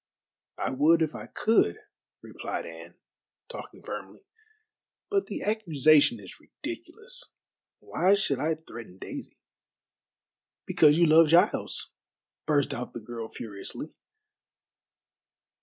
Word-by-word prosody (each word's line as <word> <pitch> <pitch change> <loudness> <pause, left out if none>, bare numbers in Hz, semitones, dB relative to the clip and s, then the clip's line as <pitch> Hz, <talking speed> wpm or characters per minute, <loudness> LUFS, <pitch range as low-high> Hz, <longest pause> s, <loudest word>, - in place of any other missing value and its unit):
"I - - -1
would 160 +5 +4
if 155 - -2
I - - -8
could," 210 - +2 0.5
replied - - -5
Anne, 85 +1 -10 0.5
talking - - -9
firmly, 100 -2 -7 0.9
"but 395 -1 +1
the 205 - -5
accusation 165 - +4
is - - -12
ridiculous. 485 +3 -7 0.5
Why 190 +3 +3
should 140 -9 0
I 160 +3 +1
threaten 115 - -11
Daisy?" - - -8 1.3
"Because 150 -1 +5
you 170 - +6
love 160 0 +7
Giles," 170 +3 +2 0.5
burst 145 -2 +2
out 125 -1 -5
the - - -5
girl 115 0 -7
furiously. 105 +8 -7
150 Hz, 110 wpm, -28 LUFS, 120-175 Hz, 1.3 s, love